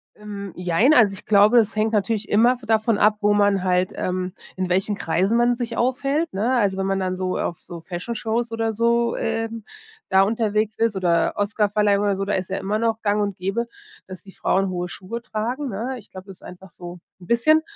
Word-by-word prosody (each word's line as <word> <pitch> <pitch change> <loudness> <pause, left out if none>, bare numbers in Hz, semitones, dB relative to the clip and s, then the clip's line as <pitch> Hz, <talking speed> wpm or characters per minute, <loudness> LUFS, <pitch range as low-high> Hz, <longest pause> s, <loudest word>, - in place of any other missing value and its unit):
Ähm, 200 -3 -8
jein. 180 - +3
Also, 220 -7 +5
ich 195 - -9
glaube, 210 +3 +5
das 220 -1 +3
hängt 215 +1 0
natürlich 215 +1 0
immer 240 +4 +4
davon 220 -1 +1
ab, 210 0 +3
wo 205 0 +3
man 205 -2 +2
halt, 180 0 +1
ähm 185 0 -3 0.2
in 185 -1 -3
welchen 190 +3 +1
Kreisen 190 +6 0
man 240 0 +3
sich 235 -1 -4
aufhält, 275 +5 0
ne? 220 +6 0
Also, 200 -4 +1
wenn 190 - -1
man 195 0 0
dann 185 -1 -2
so 185 0 -2
auf 170 - -3
so 170 -1 -10
Fashionshows 225 +6 -3
oder 225 0 -1
so, 235 +2 +1
ähm, 225 0 -3 0.5
da 190 0 +5
unterwegs 215 0 0
ist 225 -3 +1
oder 170 -3 +1
Oscarverleihung 205 0 +1
oder 200 -1 +1
so, 195 +1 -3
da 205 - -1
ist 185 0 -2
ja 190 - -2
immer 210 +2 -2
noch 225 -1 0
gang 210 0 +1
und 200 -2 -2
gäbe, 195 +6 -2 0.4
dass 185 -1 -10
die 195 - -13
Frauen 195 0 0
hohe 180 -1 -3
Schuhe 215 +6 -7
tragen, 245 +5 -3
ne? 235 +6 -4
Ich 205 - -16
glaube, 185 0 -11
das 190 -2 -11
ist - - -20
einfach 180 +1 -12
so 175 0 -10 0.2
'n 175 - -13
bisschen 310 +7 +4
210 Hz, 215 wpm, -22 LUFS, 190-230 Hz, 0.5 s, Also